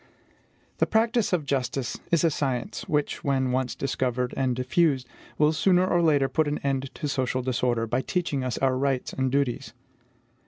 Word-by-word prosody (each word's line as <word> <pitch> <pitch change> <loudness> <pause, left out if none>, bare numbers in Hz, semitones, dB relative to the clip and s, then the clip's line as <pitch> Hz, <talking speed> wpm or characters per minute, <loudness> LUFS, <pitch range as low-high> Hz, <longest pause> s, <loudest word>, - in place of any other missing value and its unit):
The - - +3
practice 225 0 +2
of 170 -5 0
justice 130 -2 -2
is 170 -1 +2
a 165 - +4
science 130 -5 -2
which, 150 -1 -1
when 135 -2 +1
once 130 0 -1
discovered 125 -2 -1
and 130 -2 0
diffused, 130 +1 +1 0.3
will 150 +1 +4
sooner 180 +3 +3
or 175 -2 +2
later 145 -5 +3
put 155 +2 +1
an 145 - -1
end 135 -1 -1
to 150 - -3
social 130 -2 -1
disorder, 120 -2 0
by 120 +3 0
teaching 150 -4 -2
us 125 -2 -2
our 130 -1 +1
rights 135 -2 -1
and 130 -1 -1
duties. 140 -1 -1
135 Hz, 170 wpm, -26 LUFS, 130-150 Hz, 0.3 s, a